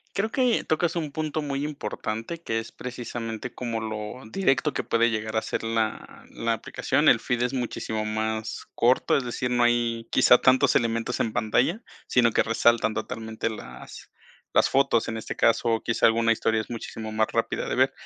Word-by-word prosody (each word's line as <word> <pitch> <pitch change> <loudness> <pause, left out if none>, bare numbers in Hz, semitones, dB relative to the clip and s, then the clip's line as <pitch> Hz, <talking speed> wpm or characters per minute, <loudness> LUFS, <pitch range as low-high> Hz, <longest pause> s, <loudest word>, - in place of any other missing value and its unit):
Creo 210 +3 0
que 250 -1 +2
tocas 160 +2 0
un 155 -4 -2
punto 155 +1 -2
muy 140 -1 -2
importante, 115 0 -4
que 115 -9 -2
es 115 - -8
precisamente 120 -1 -6
como 115 -2 -4
lo 110 +3 -5
directo 150 -3 +1
que - - -3
puede 115 0 +2
llegar 110 -1 -3
a 110 - +2
ser - - -3
la 115 -1 -2
la 115 0 -1
aplicación. 115 - +1
El - - +5
feed 120 -1 -1
es 125 0 +1
muchísimo 110 -3 -3
más 110 +1 -3
corto, 125 +2 +3
es 140 - -1
decir, 125 +1 -3
no 120 -1 +2
hay 120 -1 +1
quizá 125 -1 +6
tantos 130 0 +4
elementos 115 -1 0
en 110 - 0
pantalla, 125 - +1 0.3
sino 120 -2 +3
que - - +3
resaltan 115 -1 +2
totalmente 110 0 -4
las 110 - -10 0.4
las - - +4
fotos, 135 -4 +2
en 115 - -3
este 110 - -5
caso, 115 0 +2
o 115 -1 +1
quizá 115 - +1
alguna 115 0 +4
historia 110 -1 +1
es - - -11
muchísimo 115 -2 -6
más 110 0 +2
rápida - - -1
de - - -2
ver, - - +3
115 Hz, 185 wpm, -26 LUFS, 110-130 Hz, 0.4 s, quizá